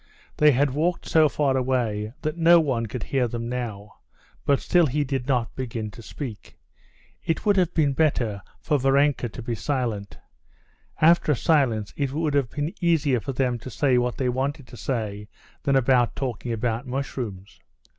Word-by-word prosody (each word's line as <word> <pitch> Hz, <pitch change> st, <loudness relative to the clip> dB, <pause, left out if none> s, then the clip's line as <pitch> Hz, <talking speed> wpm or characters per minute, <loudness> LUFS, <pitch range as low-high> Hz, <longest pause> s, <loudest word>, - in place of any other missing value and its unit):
They 150 Hz, -, +5 dB
had 140 Hz, +1 st, +2 dB
walked 165 Hz, +6 st, -1 dB
so 155 Hz, -2 st, +4 dB
far 140 Hz, -2 st, +1 dB
away 120 Hz, -5 st, -1 dB
that 155 Hz, +1 st, -1 dB
no 170 Hz, 0 st, +6 dB
one 130 Hz, -7 st, 0 dB
could 115 Hz, +1 st, -5 dB
hear 130 Hz, -3 st, 0 dB
them 115 Hz, 0 st, -4 dB
now, 110 Hz, -5 st, -5 dB, 0.5 s
but 140 Hz, -2 st, +4 dB
still 175 Hz, -3 st, +3 dB
he 145 Hz, +3 st, 0 dB
did 135 Hz, -2 st, -3 dB
not 125 Hz, -4 st, 0 dB
begin 115 Hz, -4 st, -4 dB
to 115 Hz, -, -12 dB
speak. 115 Hz, -2 st, -8 dB, 0.7 s
It 165 Hz, -, -2 dB
would 205 Hz, -1 st, +4 dB
have 180 Hz, -3 st, +2 dB
been 145 Hz, -4 st, +2 dB
better 120 Hz, -9 st, 0 dB, 0.2 s
for 150 Hz, -3 st, 0 dB
Varenka 135 Hz, -1 st, +2 dB
to 115 Hz, -, -8 dB
be 120 Hz, -, -3 dB
silent. 115 Hz, -6 st, -3 dB, 0.8 s
After 160 Hz, -1 st, +5 dB
a -, -, 0 dB
silence 120 Hz, -8 st, +1 dB
it 140 Hz, -2 st, -2 dB
would 155 Hz, -1 st, -1 dB
have 140 Hz, -4 st, +1 dB
been 145 Hz, +6 st, -3 dB
easier 155 Hz, -7 st, +2 dB
for 135 Hz, +6 st, -5 dB
them 125 Hz, -2 st, 0 dB
to 130 Hz, -, -8 dB
say 130 Hz, 0 st, +2 dB
what 125 Hz, 0 st, -1 dB
they 130 Hz, -, 0 dB
wanted 135 Hz, +3 st, -2 dB
to -, -, -11 dB
say 105 Hz, -5 st, -3 dB, 0.3 s
than 140 Hz, -2 st, +1 dB
after 125 Hz, -2 st, +4 dB
talking 125 Hz, -3 st, -3 dB
about 115 Hz, +2 st, -2 dB
mushrooms. 120 Hz, -7 st, -5 dB
130 Hz, 175 wpm, -24 LUFS, 115-145 Hz, 0.8 s, no